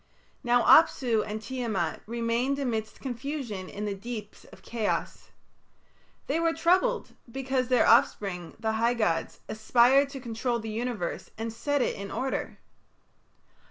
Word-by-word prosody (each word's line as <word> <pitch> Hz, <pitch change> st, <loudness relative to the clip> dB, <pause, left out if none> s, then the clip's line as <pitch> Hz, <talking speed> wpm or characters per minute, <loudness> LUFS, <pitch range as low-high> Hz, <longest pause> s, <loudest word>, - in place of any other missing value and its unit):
Now 245 Hz, -1 st, +3 dB
Apsu 245 Hz, -8 st, +5 dB
and 215 Hz, +1 st, -4 dB
Tiamat 235 Hz, -3 st, -2 dB
remained 235 Hz, +4 st, 0 dB
amidst 225 Hz, -6 st, -3 dB
confusion 250 Hz, -7 st, -5 dB
in 210 Hz, +1 st, -5 dB
the 205 Hz, -, -2 dB
deeps 215 Hz, +1 st, -8 dB
of -, -, -16 dB
chaos. 225 Hz, -3 st, -3 dB, 1.0 s
They 325 Hz, -, 0 dB
were 330 Hz, 0 st, +2 dB
troubled 370 Hz, +10 st, +2 dB, 0.2 s
because 265 Hz, 0 st, -1 dB
their 250 Hz, -2 st, +3 dB
offspring, 180 Hz, -4 st, +2 dB
the 220 Hz, 0 st, 0 dB
high 230 Hz, +2 st, +1 dB
gods, 170 Hz, -8 st, -1 dB
aspired 245 Hz, +5 st, +4 dB
to 280 Hz, -1 st, -7 dB
control 240 Hz, 0 st, -2 dB
the 220 Hz, -1 st, -5 dB
universe 225 Hz, -5 st, -3 dB
and 225 Hz, 0 st, -4 dB
set 285 Hz, +3 st, 0 dB
it -, -, -1 dB
in 200 Hz, 0 st, -6 dB
order. 265 Hz, +6 st, -3 dB
235 Hz, 135 wpm, -28 LUFS, 220-265 Hz, 1.0 s, Apsu